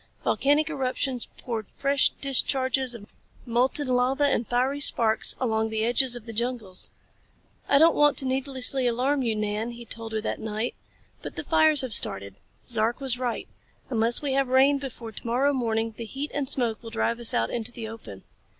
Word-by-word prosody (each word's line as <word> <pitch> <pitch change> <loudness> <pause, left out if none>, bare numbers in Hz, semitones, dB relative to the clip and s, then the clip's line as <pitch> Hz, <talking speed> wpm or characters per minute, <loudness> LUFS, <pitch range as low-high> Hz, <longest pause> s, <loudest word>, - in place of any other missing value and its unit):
Volcanic 290 +3 +2
eruptions 260 -4 -2
poured 225 -5 -5
fresh 275 0 +2
discharges 260 -2 +2
of 210 -2 -13 0.3
molten 250 +4 +1
lava 255 +3 +1
and 245 -5 0
fiery 255 +4 0
sparks 225 -6 +2
along 220 -3 0
the 220 0 -1
edges 245 +1 +3
of 240 -2 -9
the 230 - -8
jungles. 230 -5 -1 0.8
"I 280 - +5
don't 325 +3 +5
want 295 -1 +3
to 270 - +2
needlessly 260 0 0
alarm 260 +4 0
you, 230 -3 -1
Nan," 210 +2 -2
he 235 0 -9
told 225 -1 -6
her 220 - -1
that - - -4
night, 220 +2 -3 0.5
"but - - -8
the - - -4
fires 315 -2 +3
have 255 -4 -2
started. 100 - +4 0.3
Zark 230 0 +1
was 260 -3 0
right. 245 -2 -3 0.4
Unless 230 +3 +1
we 280 -2 -1
have 270 0 +1
rain 270 +2 +4
before 245 -4 -8
to 220 - -9
morrow 265 +5 +1
morning 225 -3 -1
the 230 - -7
heat 275 +7 -5
and 280 -2 -2
smoke 235 -5 -1
will 230 - -9
drive 230 +1 -1
us 235 - +5
out 115 0 0
into 235 0 -4
the 230 -2 -7
open." 220 - -10
245 Hz, 185 wpm, -25 LUFS, 225-270 Hz, 0.8 s, I